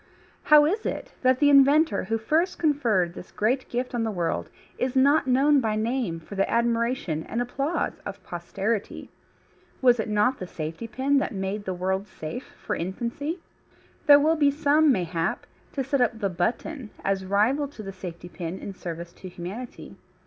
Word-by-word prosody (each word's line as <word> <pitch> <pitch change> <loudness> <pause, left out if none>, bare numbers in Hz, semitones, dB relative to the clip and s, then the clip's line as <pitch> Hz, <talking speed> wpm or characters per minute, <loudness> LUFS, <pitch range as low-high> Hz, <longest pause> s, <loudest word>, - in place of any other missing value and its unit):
How 300 -1 +7
is 405 +8 0
it - - -4
that 255 0 +4
the 290 +1 +4
inventor 280 -5 +5
who 225 +4 0
first 315 +11 +1
conferred 230 - +1
this 180 - -10
great 250 +5 0
gift 250 +1 -3
on 240 - 0
the 225 - 0
world 175 -5 -2 0.3
is 255 +1 -1
not 280 +2 +4
known 275 +3 +4
by 220 -2 0
name 220 -6 -1
for 165 - -12
the 195 0 0
admiration 235 - 0
and 230 - -2
applause 275 +6 -2
of - - -7
posterity? 195 +5 -3 0.7
Was 245 -2 +4
it 220 - -2
not 210 +5 +2
the 185 - -5
safety 160 +7 -5
pin 270 +5 +1
that 250 - -3
made 195 +2 -3
the 185 - -2
world 190 +2 -1
safe 160 +6 -8
for - - -1
infancy? 240 - -4 0.7
There 290 -1 +9
will 315 +3 +3
be 290 -3 +4
some, 295 +1 +3
mayhap, 175 -3 -1 0.3
to 275 - -1
set 265 +1 0
up 240 -2 +2
the 205 -3 -1
button 225 - -2 0.2
as 195 -1 0
rival 215 +10 +2
to 270 -6 -10
the 195 -1 -7
safety 175 -2 -8
pin 170 +1 -6
in 200 - -7
service 170 -1 -7
to 185 - -10
humanity. 185 +8 -8
230 Hz, 180 wpm, -26 LUFS, 190-275 Hz, 0.7 s, There